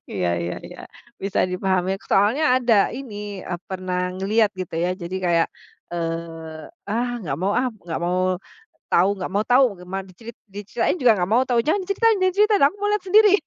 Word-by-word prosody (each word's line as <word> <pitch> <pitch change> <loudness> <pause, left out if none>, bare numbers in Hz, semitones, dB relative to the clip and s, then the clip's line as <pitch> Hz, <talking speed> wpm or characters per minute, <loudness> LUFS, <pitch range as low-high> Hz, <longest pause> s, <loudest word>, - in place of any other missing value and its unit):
Iya 90 -3 -1
iya 85 +1 -3
iya, - - -11 0.4
bisa 195 0 0
dipahami. 190 +1 0
Soalnya, 215 +10 +3 0.2
ada 225 -4 +3
ini, 205 -7 -7
e 180 - -4
pernah 185 -1 -2
ngelihat, 205 +2 +1
gitu, 185 -3 -6
ya, 180 +2 0
jadi, 185 0 -6
kayak, 170 -1 +3 0.4
eee, 165 -2 -5 0.2
"Ah, 235 +4 -1
enggak 160 -11 -4
mau, 195 - +1
ah! 255 - +1 0.2
Enggak 170 -2 -4
mau 180 +1 0 0.5
tahu 195 +4 +4
enggak 185 -1 -5
mau 200 - +1
tahu, 245 +5 +4 0.2
gimana, 190 +2 -5
dicerit 220 +5 -12 0.2
diceritain 210 - -2
juga 240 -4 +5
enggak 180 0 -1
mau 250 +3 +4
tahu! 235 -2 +2
Jangan 355 +7 +1
cerita 400 +3 +1
jangan 370 -3 +1
cerita! 420 +1 +4
Aku 405 +6 -8
lihat 420 - 0
sendiri!" 420 +1 +6
195 Hz, 180 wpm, -22 LUFS, 180-240 Hz, 0.5 s, sendiri